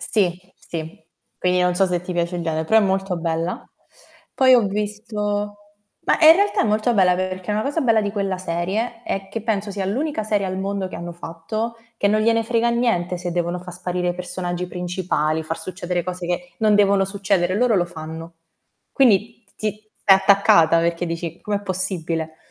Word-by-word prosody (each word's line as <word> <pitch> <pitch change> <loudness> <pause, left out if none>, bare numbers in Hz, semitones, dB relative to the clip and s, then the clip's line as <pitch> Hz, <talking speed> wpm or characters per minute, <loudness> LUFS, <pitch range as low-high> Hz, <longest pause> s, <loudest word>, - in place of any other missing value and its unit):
Sì, 180 -5 0 0.2
sì. 160 -1 -8 0.3
Quindi 180 0 +1
non 180 0 +2
so 195 - +3
se 180 -1 -1
ti 180 +1 -6
piace 175 0 -1
il 175 - -3
gene 160 -1 -1
però 220 +7 +4
è - - +5
molto 190 -1 0
bella. 165 +1 -2 0.7
Poi 260 -1 +5
ho 245 - +6
visto 210 0 -3 0.4
bah, - - +1
in 320 -1 +10
realtà 405 +1 +2
è - - 0
molto 215 +3 +1
bella 180 -3 +4
perché 185 +1 -3
una 210 +1 0
cosa 290 +6 -1
bella 230 -6 +3
di 205 -1 -2
quella 195 -3 -2
serie 190 +7 -2
è 195 -3 -4
che, 220 +2 -5
penso 210 -2 -1
sia 195 -1 -3
l'unica 270 +4 -1
serie 210 -2 0
al 185 0 -3
mondo, 195 0 -2
che 185 - -9
hanno 170 +1 -6
fatto 175 +8 -5 0.2
che 205 - +1
non 215 +1 +3
gliene 230 +1 +2
frega 235 +1 +1
niente 185 -7 0
se 175 -1 -4
devono 175 +1 -1
fa 180 0 -9
sparire 180 0 -2
i - - -4
personaggi 180 0 -4
principali, 175 -4 -1
far 160 +1 -4
succedere 180 -1 -3
cose 180 -1 -5
che 180 0 -3
non 215 -2 +4
devono 200 -1 +4
succedere. 195 -2 0
Loro 245 0 +3
lo 180 -3 +3
fanno. 160 0 -8 0.6
Quindi 235 -3 +2
t - - -31
ti 215 0 -5
stai 195 -2 +7
attaccata 190 -4 +5
perché 170 +1 0
dici: 165 0 -5
"Com'è 205 -1 -2
possibile?". 170 -4 -3
185 Hz, 190 wpm, -22 LUFS, 175-210 Hz, 0.7 s, in